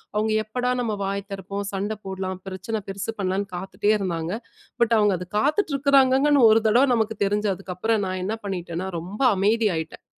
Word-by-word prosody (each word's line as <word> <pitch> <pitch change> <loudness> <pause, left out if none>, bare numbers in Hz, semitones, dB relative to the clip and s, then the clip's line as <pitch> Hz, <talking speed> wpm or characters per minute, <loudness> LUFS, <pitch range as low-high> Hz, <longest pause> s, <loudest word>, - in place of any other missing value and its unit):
அவுங்க 215 +1 +1
எப்படா! 250 +3 -1
நம்ம 225 -3 -1
வாய் 200 0 -3
திறப்போம். 200 +1 -5
சண்ட 200 +2 -2
போட்லாம், 190 -1 -4
பிரச்சனை 190 +4 -4
பெருசு 200 +3 -4
பண்ணலான்னு 195 +1 -1
காத்துட்டே 195 +3 -1
இருந்தாங்க. 170 -3 -2 0.5
பட், 235 -1 +4
அவுங்க 205 -2 +3
அத 180 - -7
காத்துட்டு 305 - +1
இருக்கிறாங்கங்கன்னு 275 +1 +4
ஒரு 225 +1 +5
தடவ 235 +5 +5
நமக்கு 220 -1 0
தெரிஞ்சதுக்கு 205 0 0
அதுக்கப்புறம் 195 +3 -1
நான் 185 0 -3
என்ன 215 +3 -1
பண்ணிட்டன்னா, 180 -1 -4
ரொம்ப 190 +7 -8 0.2
அமைதி 215 +3 +2
ஆயிட்டேன். 160 0 -6
200 Hz, 165 wpm, -24 LUFS, 190-225 Hz, 0.5 s, ஒரு